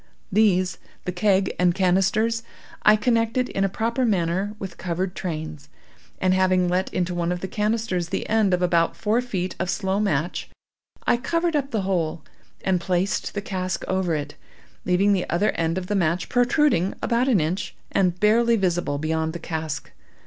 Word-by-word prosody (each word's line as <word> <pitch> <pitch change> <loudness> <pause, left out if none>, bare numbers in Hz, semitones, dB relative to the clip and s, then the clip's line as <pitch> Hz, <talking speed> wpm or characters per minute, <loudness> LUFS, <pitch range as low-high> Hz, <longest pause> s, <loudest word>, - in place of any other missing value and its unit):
These—the 185 -3 0
keg 190 +1 +2
and 180 -1 +3
canisters—I 210 +4 +1
connected 230 +2 +1
in 195 - -1
a 195 - +2
proper 230 +6 -1
manner 195 -1 0
with 190 -4 -7
covered 180 +1 -2
trains; 155 -5 -5 0.5
and 185 0 +2
having 185 -1 +3
let 180 +2 0
into 180 -1 -1
one 175 0 -1
of 180 -1 -3
the 190 - -3
canisters 210 -4 -1
the - - -3
end 220 -3 +2
of 180 0 +1
about 170 -2 +2
four 210 +7 +1
feet 190 -7 -3
of 180 - -1
slow 190 +1 0
match, 175 -5 -1 0.6
I - - +3
covered 335 +6 0
up 275 -2 0
the 220 -5 -1
hole, 170 -5 -1 0.4
and 185 -2 +2
placed 185 +4 -1
the 205 - -1
cask 185 -3 -3
over 185 -3 0
it, 145 -1 -4 0.5
leaving 195 +3 +3
the 185 -2 -1
other 190 +5 +2
end 165 +1 -1
of 185 - -3
the 205 - -2
match 175 -2 0
protruding 245 - +2
about 240 +2 +1
an 235 -8 +4
inch, 165 +5 -2 0.2
and 180 -2 +1
barely 230 +2 +4
visible 175 -7 0
beyond 160 +1 -1
the - - -4
cask. 160 -3 -5
185 Hz, 170 wpm, -24 LUFS, 175-215 Hz, 0.6 s, an